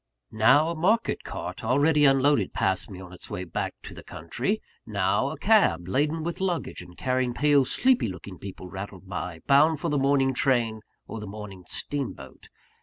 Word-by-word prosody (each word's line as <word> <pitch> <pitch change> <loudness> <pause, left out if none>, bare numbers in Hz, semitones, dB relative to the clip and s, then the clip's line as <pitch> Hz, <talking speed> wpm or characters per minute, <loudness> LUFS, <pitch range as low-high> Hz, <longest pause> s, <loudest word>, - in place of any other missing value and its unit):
Now 135 +9 +4
a - - -4
market 205 +8 +1
cart, - - -6
already 145 +5 +3
unloaded, 135 -6 +3
passed 95 +2 0
me 95 -3 -9
on 90 -1 -11
its 90 - -9
way 90 - -4
back 85 - -4
to - - -8
the - - -10
country; 120 - -3 0.2
now, 100 +4 0
a 155 - -6
cab, 140 - +3
laden 150 - 0
with 170 +2 -4
luggage 180 -3 -2
and 90 - -14
carrying 130 -1 0
pale, 145 -1 +4
sleepy 255 - +2
looking 95 -1 -8
people, 95 -2 -8
rattled 95 0 -8
by, 90 -3 -5
bound 150 +2 +4
for 170 - -2
the 145 -1 +1
morning 135 -1 +2
train 120 -4 +1 0.2
or 115 - -7
the 105 - -7
morning 100 -3 -9
steamboat. 140 -3 -4
130 Hz, 180 wpm, -26 LUFS, 95-150 Hz, 0.2 s, Now